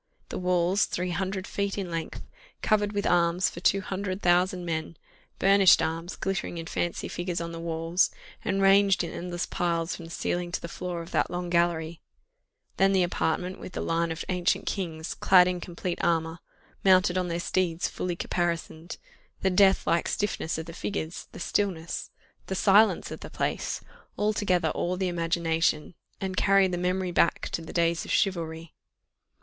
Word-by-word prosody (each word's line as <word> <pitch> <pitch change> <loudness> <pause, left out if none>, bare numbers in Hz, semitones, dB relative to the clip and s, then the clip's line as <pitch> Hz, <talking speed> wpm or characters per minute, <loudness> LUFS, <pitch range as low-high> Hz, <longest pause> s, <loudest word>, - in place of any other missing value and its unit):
The - - -4
walls, 180 +2 +2
three 180 +1 -3
hundred 190 +1 -2
feet 200 0 -2
in 190 -3 -3
length, 165 -1 -4 0.4
covered 210 -1 +2
with 205 -1 -2
arms 175 +1 +2
for - - -8
two 195 +2 +3
hundred 190 0 -4
thousand 180 0 +2
men, 160 -1 -3 0.4
burnished 195 -1 +6
arms, 165 +2 -2
glittering 195 -2 -3
in 165 - -5
fancy 175 0 -2
figures 175 0 -3
on 170 0 -4
the 165 - -7
walls, 165 +1 +1 0.3
and 195 0 0
ranged 195 -1 +5
in - - -4
endless 175 0 -4
piles 170 -1 -1
from 170 - -9
the - - -10
ceiling 175 +1 -2
to - - 0
the - - -6
floor 175 0 -5
of 165 - -12
that - - +1
long 175 0 -4
gallery; 170 -1 +1 0.8
then 195 0 +4
the 190 -1 +4
apartment 175 +1 -1
with 180 - -9
the - - -3
line 165 0 0
of 165 - -4
ancient 180 -1 0
kings, 165 -5 -3
clad 180 -1 +5
in 180 -1 -1
complete 175 0 -4
armour, 165 0 +1 0.4
mounted 185 -2 +5
on 185 -1 0
their 170 0 -2
steeds 175 -1 0
fully 180 -1 -3
caparisoned 170 -1 -3 0.4
the 190 - +2
death 190 +1 +4
like 170 +1 +1
stiffness 205 -6 -1
of 160 - -5
the 165 - -9
figures 170 -2 -4
the - - -10
stillness 175 -3 -2 0.4
the 190 - -2
silence 205 +3 +4
of - - -6
the - - -9
place - - -2 0.4
altogether 200 -6 +1
awe 180 +1 -1
the 185 0 -1
imagination, 165 -2 0 0.3
and 190 -1 -4
carry 195 -1 +5
the 180 - -2
memory 180 +1 -1
back 170 - +2
to - - -3
the 165 - -9
days 170 -1 +1
of - - -10
chivalry. 165 -4 -1
175 Hz, 175 wpm, -27 LUFS, 170-190 Hz, 0.8 s, burnished